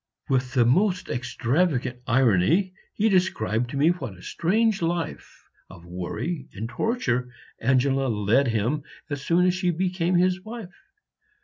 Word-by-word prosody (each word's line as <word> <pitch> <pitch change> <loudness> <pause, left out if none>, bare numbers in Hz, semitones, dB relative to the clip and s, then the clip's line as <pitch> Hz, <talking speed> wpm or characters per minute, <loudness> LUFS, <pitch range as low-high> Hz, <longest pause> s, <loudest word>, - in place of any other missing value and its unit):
With 130 -1 0
the 120 -2 +5
most 180 - +2
extravagant 125 +2 0
irony 130 - +3 0.2
he 215 - +2
described 125 - +1
to 140 - -5
me 150 +4 +4
what 130 - -3
a 90 - -15
strange 215 +4 +1
life 170 -1 -3 0.3
of 85 -2 -13
worry 90 - -4
and 110 +3 -4
torture 125 - -1 0.3
Angela 130 +2 +2
led 115 +4 +2
him 115 +6 0 0.3
as 145 -1 -3
soon 170 +5 +2
as 180 - +3
she 185 -1 0
became 180 0 0
his 180 +1 +2
wife. 215 -4 -8
140 Hz, 140 wpm, -25 LUFS, 120-180 Hz, 0.3 s, the